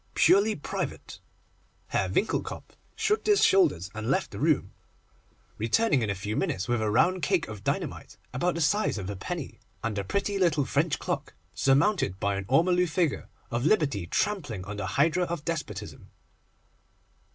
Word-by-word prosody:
'Purely 210 +2 +4
private.' - - -5 0.7
Herr - - 0
Winckelkopf - - -2 0.2
shrugged 425 +1 0
his 415 -1 +4
shoulders, 95 - +3
and 110 0 -4
left - - 0
the - - -7
room, - - +1 0.9
returning 130 - +2
in 110 - -1
a 100 - -1
few 105 +3 -4
minutes 130 - -1
with 120 -2 0
a 110 - 0
round 175 - +3
cake 185 -3 +1
of 105 -2 -8
dynamite - - -3 0.2
about 175 +7 0
the 170 - -2
size 205 - +2
of 100 0 -4
a - - -5
penny, 95 - -6 0.2
and 110 -2 -1
a - - -2
pretty 200 - -1
little 155 -6 +2
French 145 +3 +1
clock, - - -4 0.2
surmounted 135 - +2
by 100 0 0
an 100 0 -4
ormolu 175 +5 +3
figure 160 -2 -1 0.2
of 120 +1 -1
Liberty 140 - +1
trampling 145 - -1
on 105 +1 -6
the 105 - -3
hydra 165 +5 +3
of 170 -3 -5
Despotism. 165 -3 -5
145 Hz, 165 wpm, -27 LUFS, -, 0.9 s, Purely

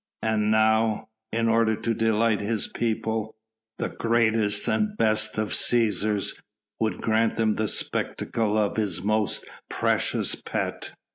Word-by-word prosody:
And 110 -1 +1
now 110 0 +2 0.2
in 115 0 0
order 115 -1 +3
to 115 +2 -2
delight 110 -1 +1
his 105 0 0
people 110 -1 -2 0.4
the - - -2
greatest 110 -3 +1
and 210 -1 0
best 110 -1 +1
of 110 -1 -1
Cæsars 105 -3 +2 0.4
would 110 -1 -1
grant 110 0 +1
them 110 -1 +2
the 110 0 -1
spectacle 110 +1 -1
of 105 -1 0
his 95 -5 -1
most 110 0 0 0.2
precious - - 0
pet. - - -4
110 Hz, 130 wpm, -25 LUFS, 105-115 Hz, 0.4 s, order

